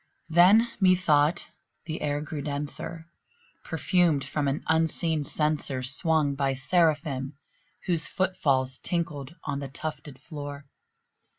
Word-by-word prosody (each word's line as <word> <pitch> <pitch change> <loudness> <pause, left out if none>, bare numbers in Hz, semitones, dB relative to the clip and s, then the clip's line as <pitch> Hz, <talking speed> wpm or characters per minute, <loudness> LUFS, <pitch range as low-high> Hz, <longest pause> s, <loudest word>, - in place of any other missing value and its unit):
Then, 185 +8 +6
methought, 175 -5 +3 0.4
the 160 -1 -5
air 145 0 -1
grew 155 -1 -5
denser, 150 +3 -5 0.6
perfumed 170 -7 +1
from 145 -2 -2
an 140 +2 -2
unseen 160 -1 +1
censer 150 -3 0
Swung 145 +2 +3
by 135 -1 0
Seraphim 145 -2 +1 0.5
whose 170 -4 +1
foot 190 0 -1
falls 130 -5 +1
tinkled 165 -4 -3
on 140 -1 -3
the 140 - -5
tufted 150 0 -7
floor. 145 -2 -8
150 Hz, 115 wpm, -27 LUFS, 140-165 Hz, 0.6 s, Then